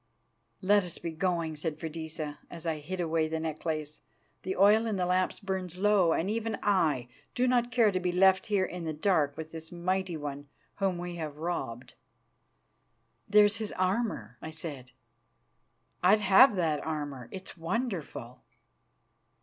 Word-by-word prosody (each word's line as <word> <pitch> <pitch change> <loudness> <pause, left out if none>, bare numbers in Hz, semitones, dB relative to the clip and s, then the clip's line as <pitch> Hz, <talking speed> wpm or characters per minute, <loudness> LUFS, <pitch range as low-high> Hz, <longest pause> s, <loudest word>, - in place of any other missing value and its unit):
"Let 205 +1 +5
us 175 -2 -5
be 170 - -5
going," 165 -1 -1
said 150 0 -4
Freydisa, 160 -2 -5
as 170 0 -9
I 160 -2 -1
hid 180 +5 -5
away 165 -2 +1
the 160 0 -2
necklace. 155 -1 -4 0.4
"The 190 +1 -3
oil 210 +4 +5
in 215 - -1
the 180 -2 0
lamps 185 +1 +1
burns 190 -3 -4
low, 195 -3 +4
and 165 - +1
even 225 +1 -1
I 155 -11 +2 0.3
do 250 +1 +2
not 245 -1 +2
care 230 -4 +4
to 185 - 0
be 180 0 0
left 190 +1 +4
here 200 -3 +2
in 180 -2 -6
the 160 - -2
dark 150 -4 +1
with 160 0 -6
this 160 0 -7
mighty 180 0 -1
one 145 -1 -6 0.3
whom 195 -3 0
we 175 0 -5
have 155 -3 -5
robbed." 150 -8 -4 1.4
"There's 205 0 +5
his 215 -1 -4
armour," 185 - -1
I - - -6
said. 150 -5 -8 1.1
"I'd 195 +4 +5
have 205 +5 +7
that 160 -5 0
armour; 145 -6 -4
it 190 -1 -8
is - - -15
wonderful." 165 - -3
175 Hz, 160 wpm, -30 LUFS, 155-195 Hz, 1.4 s, have